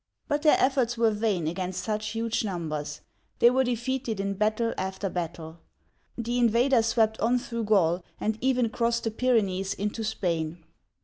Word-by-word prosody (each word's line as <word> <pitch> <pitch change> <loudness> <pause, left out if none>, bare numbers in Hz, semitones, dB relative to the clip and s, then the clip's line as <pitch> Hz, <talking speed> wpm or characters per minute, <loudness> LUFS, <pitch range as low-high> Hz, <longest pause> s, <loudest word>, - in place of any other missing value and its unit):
But 290 0 0
their 305 -1 +5
efforts 255 -3 +2
were 230 -1 +3
vain 210 -5 0
against 180 +2 -3
such 215 +1 -2
huge 225 +1 -1
numbers; 155 -7 -4 0.4
they 240 - +6
were 260 +1 +3
defeated 245 -2 -2
in 200 0 -1
battle 215 +3 0
after 190 +1 -3
battle. 165 -1 -5 0.6
The 240 +1 -1
invaders 235 0 +3
swept 220 -1 +2
on 240 +3 +2
through 235 -2 -4
Gaul, 180 -4 +2 0.2
and 215 0 0
even 250 -2 +2
crossed 235 +1 0
the 225 - -1
Pyrenees 200 -6 +1
into 210 +2 -3
Spain. 170 -6 -2
220 Hz, 160 wpm, -27 LUFS, 190-235 Hz, 0.6 s, they